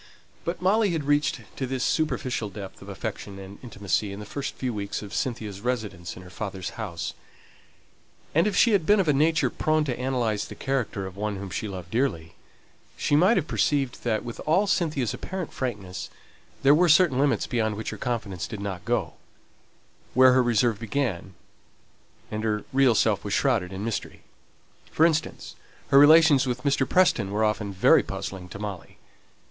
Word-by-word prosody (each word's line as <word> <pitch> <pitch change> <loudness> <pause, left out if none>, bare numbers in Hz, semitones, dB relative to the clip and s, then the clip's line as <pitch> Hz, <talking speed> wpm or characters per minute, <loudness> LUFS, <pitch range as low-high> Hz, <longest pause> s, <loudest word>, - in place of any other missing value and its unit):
But 170 +1 -3
Molly 205 +3 +3
had 160 -3 -1
reached 145 +1 +1 0.2
to 130 - -2
this 130 0 -2
superficial 130 -8 -1
depth 100 -1 -9
of - - -11
affection 100 -1 -6
and 95 +1 -10
intimacy 105 -3 -2
in 100 - -7
the 105 - -7
first 140 +6 -5
few 125 -2 -3
weeks 100 0 -4
of 100 - -9
Cynthia's 110 -7 -3
residence 105 -8 -3
in 90 - -11
her 90 - -13
father's 95 -3 -5
house; 85 -8 -5 1.2
and 165 +6 +3
if 205 - -1
she 235 - +5
had 195 -7 +2
been 210 0 +5
of 190 - +1
a 150 - +4
nature 155 +3 +2
prone 155 0 +1
to 130 -5 -2
analyse 125 -5 0
the - - -9
character 125 -7 -2
of 95 -1 -8
one 105 +1 -3
whom 95 -1 -7
she 105 - -3
loved 90 -3 -8
dearly, 95 - -1 0.6
she 145 - +1
might 185 +10 +5
have 170 - +1
perceived 140 -5 0
that, 110 -2 -1
with 120 - -7
all 185 +7 +4
Cynthia's 150 - 0
apparent 185 -3 -5
frankness, 100 -8 -4 0.5
there 140 +1 +7
were 175 +3 +4
certain 155 -5 +5
limits 140 0 +2
beyond 110 -3 -1
which 110 +1 -4
her - - -7
confidence 110 -7 -3
did 110 - -7
not 100 -3 -5
go; - - -1 1.0
where 130 0 +7
her 130 - +5
reserve 120 -2 +2
began, 110 -6 -3 1.0
and 110 0 -3
her 105 -1 -1
real 135 -3 +4
self - - +2
was - - -1
shrouded 90 0 +1
in 95 +2 -5
mystery. 115 - -4 0.7
For 160 - +3
instance, 160 -1 -1 0.4
her 140 - +7
relations 150 -2 +7
with 125 0 -3
Mr. 140 -2 +1
Preston 150 - +3
were 105 +2 0
often 105 -1 -1
very 95 - +5
puzzling 90 -2 -6
to 95 - -8
Molly. 100 -4 -7
120 Hz, 180 wpm, -26 LUFS, 100-145 Hz, 1.2 s, there